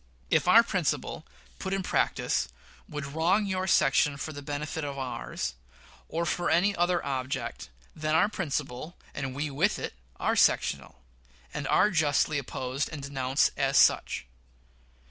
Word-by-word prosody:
If -, -, +3 dB
our -, -, +8 dB
principle, -, -, -2 dB, 0.3 s
put 190 Hz, -, -3 dB
in 195 Hz, -, -2 dB
practice, -, -, 0 dB, 0.4 s
would 150 Hz, -1 st, -4 dB
wrong 165 Hz, +9 st, +1 dB
your 190 Hz, -1 st, -1 dB
section 145 Hz, -3 st, +3 dB
for 155 Hz, +2 st, -5 dB
the 145 Hz, -, -7 dB
benefit 150 Hz, +2 st, -4 dB
of 140 Hz, -1 st, -4 dB
ours, 125 Hz, -, -4 dB, 0.6 s
or 170 Hz, +1 st, -1 dB
for 175 Hz, +1 st, 0 dB
any 200 Hz, +4 st, +3 dB
other 175 Hz, 0 st, +1 dB
object, 130 Hz, -, -3 dB, 0.3 s
then 155 Hz, 0 st, 0 dB
our 165 Hz, -, +5 dB
principle, 155 Hz, -, -4 dB, 0.2 s
and 135 Hz, -2 st, -4 dB
we 145 Hz, +1 st, -2 dB
with 170 Hz, +10 st, +1 dB
it, -, -, -4 dB, 0.3 s
are -, -, +1 dB
sectional, 65 Hz, -, +1 dB, 0.5 s
and -, -, -3 dB
are 210 Hz, -, +4 dB
justly 155 Hz, -3 st, +2 dB
opposed 130 Hz, +1 st, -3 dB
and 150 Hz, -3 st, -6 dB
denounced 135 Hz, -1 st, +1 dB
as -, -, +1 dB
such. -, -, +4 dB
150 Hz, 145 wpm, -28 LUFS, 140-175 Hz, 0.6 s, our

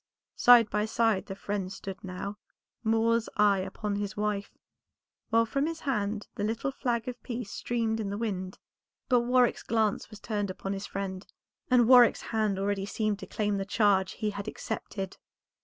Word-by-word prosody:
Side 240 Hz, -2 st, +7 dB
by 210 Hz, 0 st, +1 dB
side 220 Hz, -3 st, +1 dB
the 195 Hz, -, -5 dB
friends 195 Hz, -1 st, -4 dB
stood 195 Hz, -1 st, -8 dB
now; 195 Hz, +2 st, -6 dB, 0.4 s
Moor's 225 Hz, +1 st, +2 dB
eye 205 Hz, -2 st, +4 dB
upon 200 Hz, +2 st, -3 dB
his 205 Hz, +1 st, -4 dB
wife, 210 Hz, -1 st, -2 dB, 0.7 s
while 230 Hz, 0 st, +4 dB
from 275 Hz, +5 st, 0 dB
his 330 Hz, -1 st, -5 dB
hand 210 Hz, -6 st, -1 dB
the 205 Hz, -, -4 dB
little 225 Hz, +5 st, -1 dB
flag 240 Hz, -2 st, -2 dB
of 245 Hz, -1 st, -5 dB
peace 240 Hz, -4 st, -5 dB
streamed 225 Hz, -2 st, -1 dB
in 210 Hz, -3 st, -2 dB
the 200 Hz, -, -3 dB
wind. 190 Hz, -4 st, -3 dB, 0.5 s
But 250 Hz, -2 st, +5 dB
Warwick's 245 Hz, 0 st, +3 dB
glance 220 Hz, -3 st, 0 dB
was 215 Hz, -2 st, -11 dB
turned 205 Hz, -2 st, -2 dB
upon 195 Hz, +1 st, -4 dB
his 195 Hz, +1 st, -5 dB
friend, 190 Hz, -1 st, -5 dB, 0.4 s
and 245 Hz, -3 st, +5 dB
Warwick's 245 Hz, -2 st, +7 dB
hand 215 Hz, -3 st, +1 dB
already 195 Hz, 0 st, -1 dB
seemed 210 Hz, -1 st, -1 dB
to -, -, -8 dB
claim 210 Hz, -1 st, -1 dB
the 195 Hz, -, -1 dB
charge 200 Hz, -2 st, +2 dB
he 215 Hz, -1 st, -2 dB
had 200 Hz, +1 st, -6 dB
accepted. 195 Hz, -3 st, -5 dB
210 Hz, 175 wpm, -29 LUFS, 200-230 Hz, 0.7 s, Side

